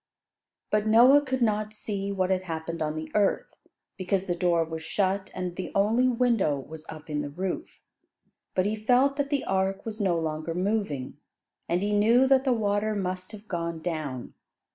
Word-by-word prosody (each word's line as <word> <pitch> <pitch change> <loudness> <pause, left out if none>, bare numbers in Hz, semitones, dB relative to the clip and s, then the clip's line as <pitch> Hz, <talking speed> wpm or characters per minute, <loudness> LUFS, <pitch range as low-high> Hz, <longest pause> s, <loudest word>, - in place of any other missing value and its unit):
But 210 0 +2
Noah 245 +6 +7
could 260 -3 -1
not 215 -1 0
see 200 -2 -3
what 190 -1 0
had 185 -1 +2
happened 165 -1 -5
on 155 0 -1
the 155 0 -6
earth, 205 -2 +1 0.5
because 190 +1 0
the 175 - 0
door 175 -1 +2
was 160 0 -6
shut, 190 +3 -1
and 180 -1 -4
the 185 - -5
only 220 +6 +3
window 235 - +2
was 155 +3 -10
up 155 -1 -9
in 150 -1 -2
the 145 - -4
roof. 190 - -5 0.8
But 185 - +2
he 210 +1 0
felt 250 +6 +3
that 285 -1 -1
the 285 -2 0
ark 190 0 0
was 220 -1 -5
no 185 -4 +2
longer 160 0 -3
moving, 180 -9 -2 0.5
and 175 +3 +1
he 205 - 0
knew 230 +5 +5
that 270 0 +4
the 260 - +3
water 210 -1 0
must 185 -1 -3
have 215 0 -11
gone 170 -3 -3
down. 155 -7 -4
195 Hz, 185 wpm, -27 LUFS, 165-215 Hz, 0.8 s, Noah